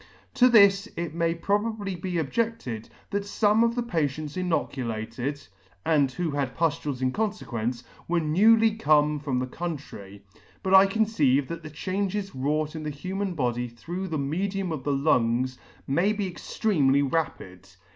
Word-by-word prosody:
To 250 0 +5
this 200 -3 +6
it 170 -2 -3
may 165 0 0
probably 205 +2 -1
be 180 0 -3
objected, 160 - -2 0.2
that 200 - 0
fome 210 +2 +2
of 235 0 +1
the 245 - 0
patients 155 - -2
inoculated, 135 -6 -3 0.4
and 145 -4 +3
who 165 +4 -2
had 140 -3 -2
puftules 145 -5 -1
in 130 - +2
confequence, 125 - -2 0.2
were 175 0 +2
newly 220 +8 +4
come 150 -7 +3
from 140 -3 -2
the 125 - 0
country; 130 - -7 0.4
but 190 -1 0
I 190 +1 +8
conceive 175 - +2
that 170 0 -5
the 155 - -8
changes 195 +5 -3
wrought 150 +4 -1
in 160 - -5
the 155 - -3
human 185 +5 -4
body 125 -4 -1
through 175 +11 -6
the 160 -3 -2
medium 185 +6 -2
of 150 -5 -4
the 145 - 0
lungs, 130 -3 +1 0.3
may 175 +10 +2
be 205 -2 -2
extremely 160 -6 +1
rapid. 100 - -3
160 Hz, 155 wpm, -26 LUFS, 135-195 Hz, 0.4 s, I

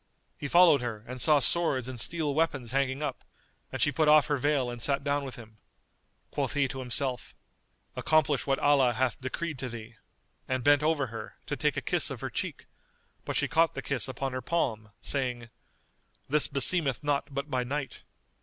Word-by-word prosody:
He 145 - -5
followed 170 -3 +6
her 115 -4 -5
and 125 +1 -5
saw 155 +2 +5
swords 140 -2 +1
and 130 -2 -6
steel 150 +4 +1
weapons 140 -6 0
hanging 135 +1 0
up; 140 -3 -4 0.5
and - - -4
she 145 - +3
put 155 +3 +1
off 150 -1 +7
her 145 -1 0
veil 135 -2 +1
and 120 -1 -8
sat 140 +3 0
down 145 0 0
with 135 -2 -6
him. 110 -2 -13 0.7
Quoth - - -2
he 140 -1 +2
to 135 - -6
himself, 125 0 -2 0.6
"Accomplish 150 -3 +2
what 135 0 +2
Allah 135 -4 +4
hath 130 +1 -1
decreed 150 +3 -4
to 130 - -4
thee," 115 -1 -9 0.5
and 130 -1 -1
bent 145 +1 +5
over 155 -2 +1
her, 115 - -7
to - - -3
take - - 0
a - - 0
kiss - - +1
of - - -6
her - - -4
cheek; - - -4 0.6
but - - -3
she - - +1
caught 165 0 +2
the - - -5
kiss 125 -7 -1
upon 135 0 -4
her 130 - -3
palm, 115 -11 -1
saying, 125 -4 -2 0.8
"This 150 +1 +4
beseemeth 140 -1 +2
not 145 -1 -1
but 140 +2 -4
by 125 -1 0
night." 135 +2 -4
135 Hz, 190 wpm, -29 LUFS, 125-145 Hz, 0.8 s, off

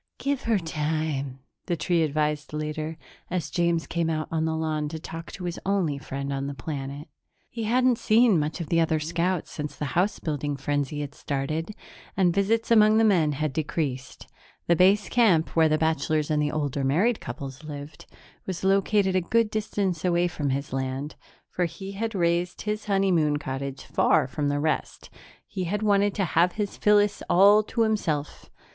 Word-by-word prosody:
"Give 275 -1 -1
her 225 -2 +3
time," 155 -5 -2 0.3
the 175 - 0
tree 170 +1 +1
advised 150 -1 -1
later, 155 +1 -4 0.3
as 180 -2 -3
James 170 -2 +1
came 170 -1 -1
out 155 -1 -2
on 160 -1 0
the 160 0 -1
lawn 155 -2 -1
to 160 - -5
talk 165 +1 -8
to 185 - -8
his 175 -1 -4
only 180 -8 0
friend 140 +1 -4
on 135 0 -3
the 140 - -5
planet. 140 +2 -6 0.4
He 230 -2 -4
hadn't 250 +1 +3
seen 220 -4 +4
much 150 +4 -2
of 165 - -5
the 165 - +3
other 160 -1 +2
scouts 170 +3 -1
since 150 -2 -5
the 150 - -4
house 195 +4 +1
building 145 -2 -3
frenzy 145 +1 -2
had 145 -1 -6
started, 155 +8 -3 0.4
and 180 -3 +3
visits 225 +5 +1
among 215 -1 +6
the 225 - +4
men 170 -9 +3
had 150 0 -2
decreased. 140 -4 -3 0.4
The 170 - +3
base 195 +4 +4
camp, 200 -10 +3
where 160 -1 +5
the 155 - +2
bachelors 155 -1 0
and 150 -1 +2
the 150 0 0
older 145 -2 -2
married 185 - +2
couples 135 +2 -7
lived, 145 -1 -9 0.4
was 185 -2 -4
located 195 0 +2
a 185 - +3
good 225 +5 +1
distance 200 -5 -2
away 175 -1 +2
from 150 -4 -3
his 140 +1 -3
land, 135 +2 -3 0.3
for 180 - -1
he 180 +4 -7
had 220 +2 -3
raised 175 0 0
his 210 0 -3
honeymoon 185 -7 +2
cottage 135 -1 -5
far - - +2
from 145 +2 -2
the 145 0 0
rest; 155 +1 -2 0.3
he 190 -2 -4
had 205 +5 -2
wanted 205 -1 +3
to 195 - +1
have 175 +2 +2
his 205 -2 -3
Phyllis 205 0 +3
all 200 +4 +6
to 220 +2 -3
himself. 165 -10 -2
165 Hz, 180 wpm, -26 LUFS, 150-195 Hz, 0.4 s, among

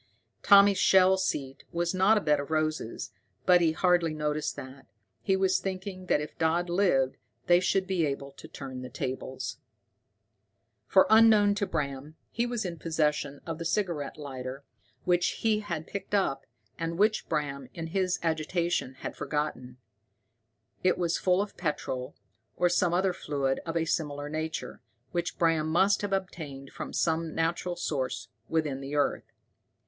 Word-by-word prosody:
Tommy's 200 -1 +7
shell 190 -1 +6
seat 140 -8 -2
was 170 +1 -1
not 190 +4 +4
a - - +1
bed 150 -3 +2
of 140 - -5
roses, 155 -6 -2 0.3
but 180 -1 +6
he 165 -2 +4
hardly 170 -1 +2
noticed 150 0 -1
that. 130 +1 -10 0.3
He 190 - +2
was 190 -1 +2
thinking 185 -1 -5
that - - +3
if 150 0 -7
Dodd 170 +2 +1
lived 155 -9 +2 0.3
they 175 0 +6
should 190 +1 +1
be 185 -5 +1
able 140 0 -4
to - - -12
turn 130 -2 -7
the 125 - -7
tables. 130 0 -5 1.3
For, 190 - +6
unknown 220 -2 +7
to 200 -1 -1
Bram, 140 +1 -3 0.2
he 235 +1 0
was 240 -4 -2
in 170 -3 -5
possession 150 -3 -1
of 165 -1 -5
the - - -3
cigarette 165 -5 -1
lighter 135 -2 -6 0.4
which 175 -1 +1
he 220 -2 +3
had 170 -7 -4
picked 200 +1 -4
up, 190 -9 0 0.3
and 165 0 -2
which 215 +2 +2
Bram, 140 -4 -2
in 165 - -4
his 185 +2 0
agitation, 165 -3 -1
had - - -4
forgotten. 130 -5 -3 1.1
It 185 - +3
was 170 -2 0
full 185 +1 +3
of 205 - -11
petrol, 130 -6 -3 0.4
or 180 - +3
some 175 0 +2
other 185 0 +2
fluid 140 -5 -1
of 165 0 -1
a 165 - +1
similar 145 -3 -2
nature, 155 -5 -4 0.3
which 175 0 -2
Bram 165 -2 +2
must 190 +5 +3
have 205 -1 -3
obtained 155 -8 -4
from - - -6
some 165 -1 0
natural 170 +2 -1
source 145 -7 -3 0.2
within 150 -4 0
the 140 +2 -5
earth. 145 - 0
165 Hz, 160 wpm, -29 LUFS, 145-185 Hz, 1.3 s, Tommy's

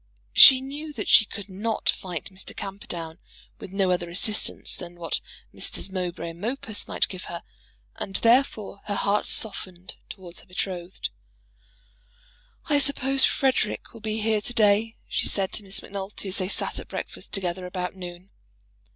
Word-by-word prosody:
She 260 -2 +10
knew 290 +3 -6
that 220 - -4
she 215 - +8
could 205 -1 -8
not 210 +3 -3
fight 180 -1 -2
Mr. 190 - -7
Camperdown 175 -4 -6 0.4
with - - -9
no 195 -1 +2
other 175 -1 0
assistance 205 +5 -1
than 175 -1 -9
what 170 -2 -1 0.3
Messrs. 195 - -1
Mowbray 175 -3 -3
and 165 +1 -14
Mopus 225 -2 -1
might - - +1
give 185 -1 -7
her, 170 - -6 0.5
and 195 - -5
therefore 230 -4 +3
her 205 - -2
heart 200 +1 +1
softened 185 -4 -1
towards 180 -3 -8
her - - -15
betrothed. 180 -1 -4 1.5
"I 290 -1 +3
suppose 270 -1 +4
Frederic 260 -5 +1
will 230 - -11
be 215 0 -2
here 215 -1 +2
to 245 - -2
day," 215 +1 +4
she - - 0
said 195 -2 +1
to 210 - +1
Miss 195 -1 -1
Macnulty, 200 0 -5
as 190 - +2
they 185 0 -1
sat - - -1
at - - -8
breakfast - - -6
together 180 -2 -2
about 180 0 -4
noon. 180 +1 -9
195 Hz, 160 wpm, -26 LUFS, 180-220 Hz, 1.5 s, She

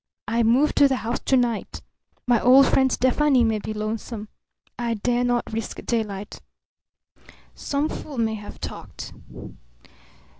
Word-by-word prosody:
I 230 +2 +1
move 245 +7 +3
to 285 - +7
the 270 - +1
house 235 +2 -1
to 265 - +3
night. 240 -3 -2 0.4
My 240 -3 +3
old 265 +3 +7
friend 265 0 +3
Stefani 260 +1 +3
may 220 -2 +1
be 215 - -5
lonesome. 215 0 -5 0.5
I 235 -1 -1
dare 240 +3 0
not 245 -2 -1
risk 225 0 -4
daylight. 210 -4 -3 1.1
Some 285 +1 -2
fool 295 -3 -7
may 225 -1 +1
have 205 -1 -9
talked. - - -8
235 Hz, 140 wpm, -24 LUFS, 220-260 Hz, 1.1 s, to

